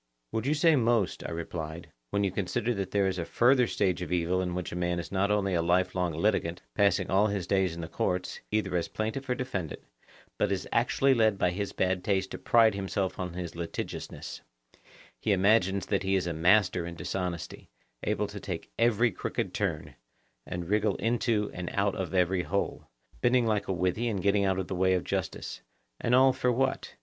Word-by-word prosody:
Would 110 Hz, +3 st, -2 dB
you 150 Hz, -, +2 dB
say 160 Hz, +1 st, +5 dB
'most,' 115 Hz, -6 st, +1 dB
I -, -, -5 dB
replied, 85 Hz, 0 st, -6 dB, 0.2 s
when 100 Hz, -, 0 dB
you 100 Hz, -, +1 dB
consider 100 Hz, +5 st, -1 dB
that 100 Hz, -3 st, -3 dB
there 100 Hz, -1 st, +2 dB
is 95 Hz, -1 st, -1 dB
a -, -, -1 dB
further 125 Hz, +7 st, +3 dB
stage 95 Hz, -5 st, 0 dB
of 90 Hz, -, -4 dB
the 90 Hz, -, +1 dB
evil 90 Hz, +2 st, +1 dB
in 90 Hz, -1 st, -2 dB
which 90 Hz, -1 st, -4 dB
a -, -, -5 dB
man 90 Hz, 0 st, 0 dB
is 85 Hz, -, -5 dB
not 100 Hz, +1 st, +1 dB
only 100 Hz, -2 st, +1 dB
a 85 Hz, -, +2 dB
life 90 Hz, +2 st, +2 dB
long 90 Hz, -2 st, 0 dB
litigant, 85 Hz, -, 0 dB
passing 100 Hz, 0 st, +2 dB
all 100 Hz, +3 st, +4 dB
his 100 Hz, -4 st, -2 dB
days 95 Hz, -3 st, +1 dB
in 85 Hz, -, -6 dB
the 80 Hz, -, -5 dB
courts, 90 Hz, +2 st, -2 dB
either 105 Hz, -4 st, 0 dB
as 85 Hz, -, 0 dB
plaintiff 110 Hz, +5 st, -4 dB
or 125 Hz, -, +2 dB
defendant, 100 Hz, -, -4 dB, 0.6 s
but -, -, +2 dB
is 95 Hz, -, -2 dB
actually 135 Hz, +3 st, +3 dB
led 110 Hz, -4 st, +3 dB
by 90 Hz, -2 st, +2 dB
his 100 Hz, +2 st, -3 dB
bad 95 Hz, -1 st, 0 dB
taste 95 Hz, -2 st, 0 dB
to -, -, -6 dB
pride 115 Hz, -2 st, +5 dB
himself 95 Hz, -1 st, -2 dB
on 90 Hz, -2 st, -3 dB
his 90 Hz, -2 st, -5 dB
litigiousness; 85 Hz, -1 st, -6 dB, 0.8 s
he 105 Hz, -, +1 dB
imagines 100 Hz, -1 st, +3 dB
that 100 Hz, -, 0 dB
he 95 Hz, 0 st, +1 dB
is 95 Hz, -3 st, +1 dB
a 85 Hz, -, -2 dB
master 90 Hz, +2 st, +3 dB
in 85 Hz, -, -7 dB
dishonesty; 90 Hz, -1 st, -4 dB, 0.3 s
able -, -, 0 dB
to -, -, -7 dB
take -, -, -6 dB
every 115 Hz, 0 st, +3 dB
crooked -, -, -3 dB
turn, 75 Hz, -2 st, -2 dB, 0.5 s
and 90 Hz, -1 st, -4 dB
wriggle 105 Hz, +1 st, +2 dB
into 115 Hz, -2 st, 0 dB
and 90 Hz, 0 st, -4 dB
out 100 Hz, 0 st, +2 dB
of 95 Hz, -3 st, -4 dB
every 90 Hz, 0 st, +2 dB
hole, 100 Hz, +3 st, -2 dB, 0.3 s
bending 120 Hz, 0 st, +3 dB
like 105 Hz, -2 st, 0 dB
a -, -, -1 dB
withy 90 Hz, +6 st, 0 dB
and 100 Hz, -5 st, -2 dB
getting 100 Hz, 0 st, +3 dB
out 95 Hz, -1 st, +1 dB
of 95 Hz, -2 st, -2 dB
the -, -, -4 dB
way 95 Hz, 0 st, +3 dB
of 90 Hz, -, -1 dB
justice: -, -, -4 dB, 0.4 s
and 120 Hz, -, +2 dB
all 130 Hz, +1 st, +6 dB
for 125 Hz, -1 st, +1 dB
what? 135 Hz, +2 st, -1 dB
95 Hz, 210 wpm, -29 LUFS, 90-110 Hz, 0.8 s, all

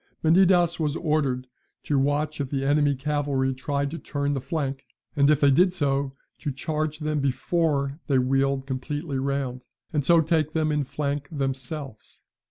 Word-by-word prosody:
Menidas 175 Hz, 0 st, +4 dB
was 150 Hz, -2 st, 0 dB
ordered 145 Hz, -6 st, 0 dB, 0.4 s
to 145 Hz, -2 st, +1 dB
watch 145 Hz, +2 st, 0 dB
if 135 Hz, -, -3 dB
the 135 Hz, -1 st, -1 dB
enemy's 145 Hz, -1 st, +3 dB
cavalry 140 Hz, -2 st, 0 dB
tried 140 Hz, +2 st, -2 dB
to 165 Hz, -, -5 dB
turn 145 Hz, -1 st, -2 dB
the 135 Hz, -, -2 dB
flank, 140 Hz, -4 st, -3 dB, 0.3 s
and 140 Hz, -1 st, +4 dB
if 150 Hz, -1 st, +3 dB
they 140 Hz, -1 st, +6 dB
did 180 Hz, +6 st, +4 dB
so, 140 Hz, -4 st, 0 dB, 0.3 s
to 145 Hz, -, -3 dB
charge 155 Hz, +3 st, -2 dB
them 150 Hz, -1 st, -1 dB
before 140 Hz, +1 st, 0 dB
they 140 Hz, -, +3 dB
wheeled 135 Hz, +1 st, +1 dB
completely 140 Hz, +2 st, -3 dB
round, 135 Hz, -2 st, -2 dB, 0.3 s
and 150 Hz, -2 st, +1 dB
so 170 Hz, +5 st, +5 dB
take 160 Hz, -1 st, +1 dB
them 155 Hz, -2 st, +1 dB
in 150 Hz, -1 st, +1 dB
flank 140 Hz, +1 st, -3 dB
themselves. 135 Hz, -3 st, -5 dB
145 Hz, 165 wpm, -25 LUFS, 135-155 Hz, 0.4 s, they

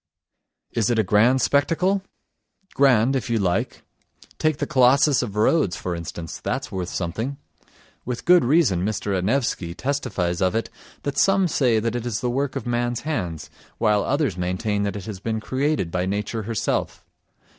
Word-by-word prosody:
Is 115 Hz, -1 st, 0 dB
it 120 Hz, -, +1 dB
a 110 Hz, -, +3 dB
grand 115 Hz, +7 st, +3 dB
spectacle? 180 Hz, +7 st, +2 dB, 0.7 s
Grand, 135 Hz, -2 st, +4 dB
if 130 Hz, -, -2 dB
you 115 Hz, -, +1 dB
like. 95 Hz, -4 st, -1 dB, 0.6 s
Take 155 Hz, -2 st, +1 dB
the -, -, -1 dB
Colossus 135 Hz, +1 st, +4 dB
of 105 Hz, -5 st, -5 dB
Rhodes, 105 Hz, -, +2 dB
for 90 Hz, -1 st, -4 dB
instance, 85 Hz, 0 st, -7 dB
that's 135 Hz, +2 st, -3 dB
worth 90 Hz, -3 st, -3 dB
something. 110 Hz, +10 st, -3 dB, 0.7 s
With 125 Hz, -1 st, -5 dB
good 180 Hz, +1 st, +6 dB
reason 120 Hz, -, +3 dB
Mr. 100 Hz, -1 st, -1 dB
Anaevsky 95 Hz, -4 st, -1 dB
testifies 100 Hz, -10 st, -2 dB
of 95 Hz, +2 st, +2 dB
it 115 Hz, -2 st, -2 dB, 0.3 s
that 145 Hz, -, -2 dB
some 195 Hz, -1 st, +4 dB
say 125 Hz, -8 st, +2 dB
that 115 Hz, +2 st, -2 dB
it 120 Hz, 0 st, -3 dB
is 110 Hz, -3 st, -2 dB
the 125 Hz, -, -1 dB
work 135 Hz, +2 st, -1 dB
of -, -, -4 dB
man's 120 Hz, 0 st, -1 dB
hands, 90 Hz, -, -4 dB, 0.3 s
while 105 Hz, -1 st, +2 dB
others 135 Hz, -, 0 dB
maintain 90 Hz, +4 st, -1 dB
that 100 Hz, -, -2 dB
it 100 Hz, -3 st, -6 dB
has 105 Hz, -4 st, -6 dB
been 110 Hz, +2 st, -2 dB
created 130 Hz, -, -1 dB
by 90 Hz, +1 st, -1 dB
nature 105 Hz, +3 st, -2 dB
herself. 110 Hz, +1 st, -2 dB
115 Hz, 165 wpm, -23 LUFS, 95-135 Hz, 0.7 s, good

